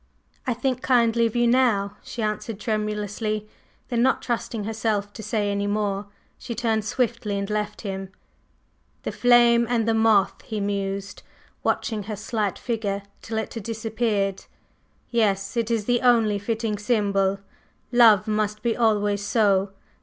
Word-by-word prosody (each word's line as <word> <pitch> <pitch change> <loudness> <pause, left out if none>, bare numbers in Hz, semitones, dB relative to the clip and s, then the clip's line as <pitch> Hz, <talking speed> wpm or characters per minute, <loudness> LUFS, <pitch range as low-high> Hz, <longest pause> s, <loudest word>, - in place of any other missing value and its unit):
"I 250 - +1
think 255 +1 -1
kindly 235 -2 +3
of 225 - -7
you 240 0 +3
now," 235 -5 +2
she 235 - -5
answered 210 0 -3
tremulously; 215 0 -2 0.4
then, 240 -2 +1
not 260 +2 +2
trusting 230 -2 -2
herself 210 -1 -1
to 220 - -8
say 210 -1 -1
any 200 0 -1
more, 205 -1 -1 0.3
she 235 - -6
turned 220 -2 0
swiftly 230 -4 -1
and 200 0 -2
left 210 0 -2
him. 195 -2 -5 0.9
"The - - -2
flame 240 -1 +5
and 230 -2 +1
the 225 - +3
moth!" 220 -3 +3
he 215 -2 -5
mused, 200 0 -3 0.4
watching 220 -2 -1
her 215 0 -4
slight 210 -2 -2
figure 205 -4 -2 0.2
till 220 - -4
it 220 - -3
had 230 - -5
disappeared. 220 -2 -1 0.7
"Yes, 200 -4 +1
it 230 -1 0
is 225 -3 0
the 245 0 +2
only 225 -5 +4
fitting 220 0 -2
symbol. 200 -3 +1 0.5
Love 225 -4 +6
must 210 0 -1
be 235 -2 +1
always 205 -3 +1
so. 205 -2 +2
215 Hz, 150 wpm, -24 LUFS, 205-230 Hz, 0.9 s, Love